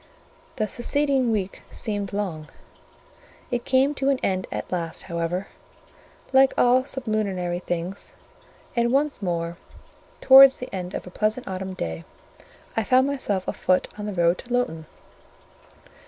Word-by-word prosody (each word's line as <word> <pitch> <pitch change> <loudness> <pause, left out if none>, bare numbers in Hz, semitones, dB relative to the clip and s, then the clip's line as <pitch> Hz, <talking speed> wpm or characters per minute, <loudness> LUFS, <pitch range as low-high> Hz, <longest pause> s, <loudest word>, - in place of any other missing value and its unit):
The 215 -4 -1
succeeding 265 +2 0
week 195 -3 -2
seemed 205 -3 -3
long: 185 -7 -4 1.0
it 240 -1 -2
came 265 +2 +3
to 275 -1 0
an 275 - +3
end 185 -1 0
at - - -5
last, 170 -3 -2
however, 170 +2 -3 0.8
like 265 0 +5
all 250 +1 +4
sublunary 205 -9 -2
things, 175 +2 -5 0.6
and 235 0 +2
once 285 0 +1
more, 170 -2 -2 0.6
towards 270 0 +9
the 250 - -5
close 185 -5 -6
of - - -5
a 180 - -10
pleasant 215 +6 -1
autumn 190 0 -5
day, 80 - -4 0.7
I 225 - +1
found 255 +5 +4
myself 235 -9 -2
afoot 185 0 +1
on 210 0 -6
the 205 - -3
road 170 0 +2
to 245 - -11
Lowton. 165 -11 -1
205 Hz, 140 wpm, -24 LUFS, 180-255 Hz, 1.0 s, towards